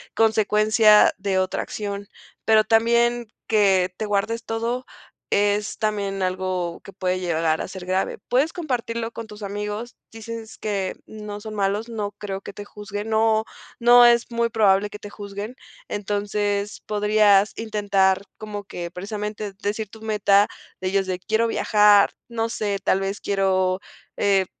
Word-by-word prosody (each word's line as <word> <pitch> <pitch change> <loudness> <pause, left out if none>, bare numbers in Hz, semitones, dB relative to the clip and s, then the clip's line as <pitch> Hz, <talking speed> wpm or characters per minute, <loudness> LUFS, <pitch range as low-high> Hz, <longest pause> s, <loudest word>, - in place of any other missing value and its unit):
consecuencia 215 -1 +5
de 195 -1 -1
otra 185 0 -1
acción. 200 -1 -5 0.4
Pero, 220 -1 +5
también 235 +1 +2 0.2
que 190 -4 +3
te 215 - -2
guardes 215 +3 -1
todo, 235 +3 -2 0.4
es 205 +1 +1
también 200 -2 -1
algo 185 -2 -2
que 195 - -11
puede 185 -1 -1
llegar 165 -3 0
a - - -3
ser 185 -1 -8
grave. 185 +1 -1
Puedes 280 +6 +2
compartirlo 235 -8 -3
con 230 -1 -7
tus 210 0 -11
amigos. 210 +3 -5
Dices 225 0 -8
que 200 -3 -2
no 210 -1 -8
son 215 0 -7
malos. 205 +2 -1
No 210 -3 -4
creo 195 -1 -5
que 195 - -9
te 205 - -8
juzguen. 205 +1 -7
No, 220 0 +3 0.3
no 240 +1 +7
es 235 0 +4
muy 235 0 +1
probable 205 -3 +3
que 210 - -9
te 205 - -9
juzguen. 205 +3 -7 0.3
Entonces, 205 0 -2
podrías 210 -1 +4
intentar, 200 -3 +1 0.2
como 210 -2 -6
que, 175 -3 -6
precisamente 210 +3 -5
decir 210 +1 -2
tu 220 - -13
meta 210 -2 +3 0.3
de 185 - -3
ellos 195 0 +1
de: 185 -1 -2
"Quiero 220 +4 +1
viajar", 210 -2 +5 0.2
no 230 -1 -1
sé, 205 -3 -2
tal 190 - +2
vez 195 +1 -3
quiero, 190 -1 +1 0.3
eh, 195 -2 +2
210 Hz, 150 wpm, -23 LUFS, 195-220 Hz, 0.4 s, no